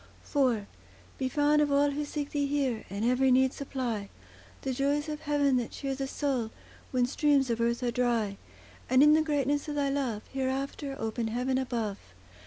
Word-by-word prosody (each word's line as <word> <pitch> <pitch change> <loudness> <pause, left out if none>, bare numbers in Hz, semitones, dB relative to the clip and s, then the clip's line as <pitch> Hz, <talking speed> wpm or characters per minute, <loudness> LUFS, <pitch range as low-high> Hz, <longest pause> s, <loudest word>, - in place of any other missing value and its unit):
IV 250 -8 +1 0.5
Be 260 -1 0
found 295 +2 +3
of 290 -1 +1
all 285 +1 +4
who 295 +1 -2
seek 290 0 -4
Thee 285 -1 0
here, 275 -5 -1
And 200 +3 -2
every 255 +2 +3
need 260 +1 +4
supply— 240 -7 -3 0.5
The 265 - -1
joys 285 +3 0
of 300 -1 -4
heaven 290 -3 +2
that 240 -2 -1
cheer 275 -1 -4
the 270 0 -3
soul, 265 -5 -1 0.4
When 250 -1 +2
streams 275 -1 +2
of 230 0 -1
earth 235 +2 0
are 240 - +1
dry; 235 -5 0 0.5
And 255 +2 +6
in 300 0 +7
the 315 - +5
greatness 290 -2 0
of 295 - -3
Thy 285 -1 +1
love, 260 -6 -1
Hereafter, 270 +1 -2
open 225 +1 -2
heaven 250 +3 0
above. 230 -6 -2
265 Hz, 185 wpm, -29 LUFS, 240-285 Hz, 0.5 s, in